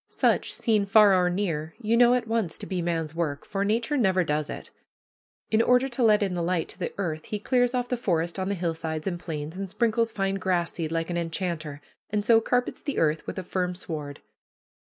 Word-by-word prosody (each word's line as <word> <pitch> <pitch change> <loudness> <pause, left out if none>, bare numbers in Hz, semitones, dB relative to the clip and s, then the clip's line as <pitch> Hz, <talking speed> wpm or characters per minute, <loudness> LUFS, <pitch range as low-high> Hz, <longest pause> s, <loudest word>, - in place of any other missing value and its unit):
Such, - - +1
seen 215 -3 +1
far 205 0 +7
or 180 -1 +3
near, 165 -4 -2
you 225 -1 +1
know 240 +1 +6
at 240 -2 -1
once 220 -7 -1
to - - -7
be 185 -2 -2
man's 165 -2 -2
work, 155 -4 -2
for 195 -1 -2
Nature 230 +8 0
never 190 -6 +3
does 150 -1 -1
it. - - -7 0.8
In 220 0 +4
order 250 +2 +4
to 250 0 -4
let 215 -3 +5
in 195 -2 -1
the 175 - -2
light 170 -1 0
to - - -10
the - - -2
earth 160 -5 -3
he 210 - -4
clears 245 +3 +1
off 245 -1 0
the 250 - 0
forest 175 -6 -1
on 190 +1 -1
the 200 - 0
hillsides 160 -3 -3
and 175 -3 -2
plains, 155 -2 -5
and 195 0 -5
sprinkles 230 +2 +1
fine 195 -1 -1
grass 180 -3 0
seed 160 -2 -3
like 165 +1 -1
an 175 - -1
enchanter, 165 -4 -3 0.3
and 205 0 -1
so 225 0 +6
carpets 245 +2 -1
the 285 - -4
earth 155 -1 +1
with - - -5
a 185 - -3
firm 180 0 -2
sward. 150 -5 -6
185 Hz, 225 wpm, -26 LUFS, 165-220 Hz, 0.8 s, far